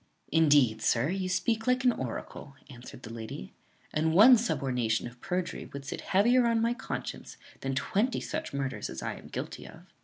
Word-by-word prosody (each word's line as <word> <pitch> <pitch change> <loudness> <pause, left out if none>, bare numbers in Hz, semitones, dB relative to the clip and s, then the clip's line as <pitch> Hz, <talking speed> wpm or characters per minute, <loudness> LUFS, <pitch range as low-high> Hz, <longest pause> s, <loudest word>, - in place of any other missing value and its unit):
"Indeed, 145 -9 +4
sir, 125 +6 +2
you 185 0 -2
speak 220 +6 0
like 250 +1 +2
an 250 - +5
oracle," 135 - -6 0.2
answered 125 0 -11
the 115 - -8
lady; 110 - -7 0.4
"and 160 +1 +1
one 235 +7 +9
subornation 125 - 0
of 125 0 -10
perjury 180 -1 -3
would 140 0 -7
sit - - -5
heavier 235 +6 +3
on 230 -1 +2
my 230 +1 +2
conscience 240 - -6 0.2
than 135 0 -3
twenty 215 - 0
such - - -4
murders 135 -1 -3
as - - -6
I - - -2
am - - -12
guilty - - -6
of." - - -14
160 Hz, 180 wpm, -29 LUFS, -, 0.4 s, one